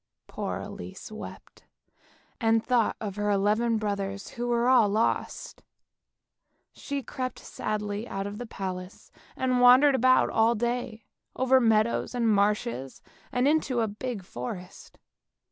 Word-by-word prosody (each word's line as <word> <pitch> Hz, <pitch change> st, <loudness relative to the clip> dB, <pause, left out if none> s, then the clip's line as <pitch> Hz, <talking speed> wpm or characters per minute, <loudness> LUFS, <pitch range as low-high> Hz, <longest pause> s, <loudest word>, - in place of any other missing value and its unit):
Poor -, -, -4 dB
Elise -, -, -8 dB
wept, -, -, -10 dB, 0.7 s
and 225 Hz, -1 st, +2 dB
thought 245 Hz, -3 st, +2 dB
of 205 Hz, -2 st, -5 dB
her 205 Hz, 0 st, 0 dB
eleven 210 Hz, +3 st, +2 dB
brothers 200 Hz, -2 st, -3 dB
who 240 Hz, 0 st, -4 dB
were 240 Hz, 0 st, +1 dB
all 250 Hz, -5 st, +5 dB
lost. 215 Hz, +3 st, -1 dB, 1.1 s
She 280 Hz, -1 st, -5 dB
crept 255 Hz, 0 st, -5 dB
sadly 210 Hz, +1 st, -4 dB
out 195 Hz, -3 st, -4 dB
of 205 Hz, +1 st, -6 dB
the 245 Hz, -, -6 dB
palace 185 Hz, -1 st, -7 dB, 0.2 s
and 255 Hz, -1 st, +1 dB
wandered 255 Hz, +4 st, +7 dB
about 255 Hz, 0 st, +4 dB
all 225 Hz, +1 st, +3 dB
day, 235 Hz, -1 st, -3 dB, 0.3 s
over 260 Hz, 0 st, +4 dB
meadows 225 Hz, +1 st, +2 dB
and 235 Hz, -2 st, +1 dB
marshes, 200 Hz, -, 0 dB, 0.3 s
and 250 Hz, +2 st, +2 dB
into 285 Hz, -5 st, +1 dB
a 225 Hz, -, +1 dB
big 215 Hz, 0 st, -5 dB
forest. 180 Hz, -, -8 dB
225 Hz, 130 wpm, -27 LUFS, 205-245 Hz, 1.1 s, wandered